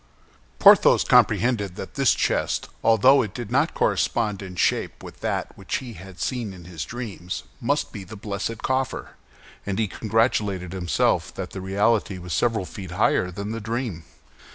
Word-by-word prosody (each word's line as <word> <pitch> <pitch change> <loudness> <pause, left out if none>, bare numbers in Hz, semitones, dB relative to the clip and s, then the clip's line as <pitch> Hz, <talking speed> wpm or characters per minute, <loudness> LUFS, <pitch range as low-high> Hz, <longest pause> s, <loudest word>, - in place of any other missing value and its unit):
Porthos - - +7
comprehended 105 -6 +3
that - - -7
this - - +3
chest, - - 0
although 115 +5 +6
it 105 -2 -5
did 120 -3 -6
not 145 +6 +2
correspond 105 -5 +1
in 95 -2 -8
shape - - 0
with - - -11
that - - -3
which - - -4
he 125 -3 -5
had 95 -3 -12
seen 120 -6 -2
in 90 -2 -12
his 85 -3 -6
dreams, 105 -7 -6 0.2
must - - 0
be 100 - -7
the 95 +4 -10
blessed 105 +2 -4
coffer, 130 -1 -1 0.5
and 100 -1 -3
he 110 -1 +1
congratulated 105 -4 0
himself 90 -3 +1
that - - -5
the 95 - -6
reality 100 +1 +1
was 90 -1 -6
several 115 -5 +1
feet 95 -1 -8
higher 90 0 +2
than 100 +4 -5
the 115 0 -4
dream. 110 -6 -3
105 Hz, 165 wpm, -24 LUFS, 95-115 Hz, 0.5 s, Porthos